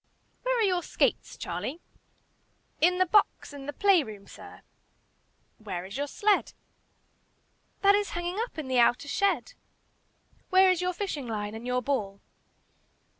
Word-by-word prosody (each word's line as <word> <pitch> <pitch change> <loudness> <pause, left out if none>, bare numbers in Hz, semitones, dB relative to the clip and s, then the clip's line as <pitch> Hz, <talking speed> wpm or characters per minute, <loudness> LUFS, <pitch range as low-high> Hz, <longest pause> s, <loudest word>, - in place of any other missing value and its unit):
"Where - - 0
are 460 - +2
your 365 -3 +2
skates, - - -1
Charlie?" 305 +6 -4 1.0
"In 360 +3 +4
my 370 - +5
box 400 -5 +2
in 280 -1 -9
the - - -2
play 390 +2 +4
room, 210 -6 -9
sir." - - -13 1.0
"Where 185 -5 -5
is 195 +2 -9
your 285 +1 -2
sled?" 415 +7 +1 1.3
"That 400 0 +6
is 410 0 +1
hanging 350 +3 -3
up 470 -4 -4
in 305 -4 -4
the 255 -1 +2
outer 240 +3 +3
shed." 400 - 0 1.0
"Where 375 0 +6
is 365 -1 0
your 365 0 0
fishing 345 -9 -4
line 210 -2 -4
and 225 +2 -7
your 250 0 0
ball?" 205 -8 -2
315 Hz, 150 wpm, -28 LUFS, 240-390 Hz, 1.3 s, That